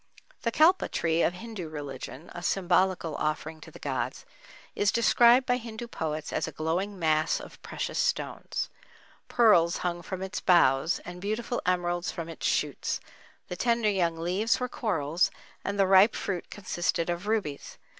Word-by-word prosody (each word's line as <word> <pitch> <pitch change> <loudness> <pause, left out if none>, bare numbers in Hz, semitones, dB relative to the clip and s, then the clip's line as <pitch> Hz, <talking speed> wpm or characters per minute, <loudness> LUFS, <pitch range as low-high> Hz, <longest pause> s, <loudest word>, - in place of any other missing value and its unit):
The 230 - 0
Kalpa 335 +9 +4
Tree 165 0 +1
of 175 - +2
Hindu 205 -5 -7
religion, 145 +1 -7
a 175 - -7
symbolical 180 -3 +1
offering 155 +1 -3
to - - -11
the - - -13
gods, - - -3 0.5
is 205 +1 +2
described 235 +2 +5
by 245 0 +2
Hindu 230 -1 -7
poets 155 -8 -4
as - - -1
a - - -5
glowing 175 +7 -2
mass 155 -2 +2
of - - -12
precious - - -4
stones. - - -2 0.6
Pearls 180 -8 +4
hung 175 -1 -1
from 190 +2 -5
its 190 +1 -4
boughs 165 -3 +4
and 175 0 -8
beautiful 225 +4 -2
emeralds 175 -1 0
from 165 -1 -6
its 165 - -3
shoots; - - -1 0.5
the 180 - -5
tender 230 +1 +2
young 170 -4 0
leaves 185 +7 +1
were 250 - -1
corals, 170 - 0 0.3
and 200 0 -3
the 195 - +5
ripe 190 +3 +6
fruit 185 -4 -3
consisted 175 -3 -1
of 175 +3 -3
rubies. 205 -10 -2
180 Hz, 160 wpm, -28 LUFS, 165-215 Hz, 0.6 s, ripe